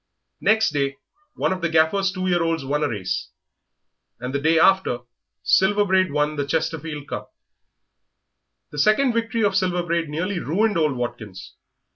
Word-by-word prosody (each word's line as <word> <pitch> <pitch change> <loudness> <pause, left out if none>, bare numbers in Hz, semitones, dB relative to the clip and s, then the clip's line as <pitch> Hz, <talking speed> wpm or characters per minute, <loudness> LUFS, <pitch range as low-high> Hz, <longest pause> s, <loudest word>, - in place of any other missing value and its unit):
Next 220 -2 +3
day 140 -2 -1 0.4
one - - 0
of 185 - -6
the 170 - 0
Gaffer's 165 +5 +2
two 185 -1 -4
year 175 -2 +2
olds 165 -3 -1
won 145 +2 -1
a 145 - +1
race, 95 -4 -3 0.9
and 125 +2 -5
the 140 - 0
day 160 +2 +3
after 190 -8 +3 0.4
Silver 205 +2 +3
Braid 190 -2 +2
won 150 +1 0
the 140 - -1
Chesterfield 160 -1 -3
Cup. - - -6 1.4
The 150 - -6
second 235 - +3
victory 230 0 -1
of 200 -2 +2
Silver 180 -2 +1
Braid 170 -2 -1
nearly 180 +5 -2
ruined 205 +8 0
old 155 -3 +2
Watkins. 120 -6 -6
165 Hz, 160 wpm, -23 LUFS, 145-190 Hz, 1.4 s, Next